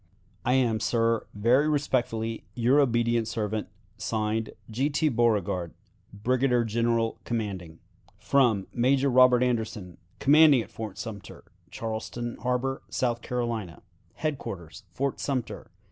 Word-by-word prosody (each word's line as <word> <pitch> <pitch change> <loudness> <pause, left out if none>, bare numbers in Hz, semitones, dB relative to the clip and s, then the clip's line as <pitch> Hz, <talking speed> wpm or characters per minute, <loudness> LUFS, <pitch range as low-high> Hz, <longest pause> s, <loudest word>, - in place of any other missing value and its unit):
"I 125 - +2
am, 120 -4 +2
sir, 115 +1 +1
very 125 +8 +3
respectfully, 120 -6 -1
your 125 +4 +3
obedient 120 -3 +2
servant, 110 -2 -2 0.3
(Signed) 110 0 -1 0.2
"G. 130 +6 0
T. 155 +1 +1
Beauregard, 105 - 0 0.4
"Brigadier 125 +4 +1
General 115 0 0
commanding. 95 -8 -4 1.0
"Major 135 +3 +2
Robert 125 0 +6
Anderson, 110 -7 -2 0.2
"Commanding 145 -2 +6
at - - -16
Fort 110 -1 -7
Sumter, 105 -4 -8 0.3
Charleston 115 +3 -5
Harbor, 125 +1 -1
S. - - -8 0.3
C." 120 -5 -2 0.5
"Headquarters 105 - -5
Fort 135 +9 -2
Sumter, 130 -5 -3
S. - - -34
115 Hz, 115 wpm, -27 LUFS, 110-130 Hz, 1.0 s, Robert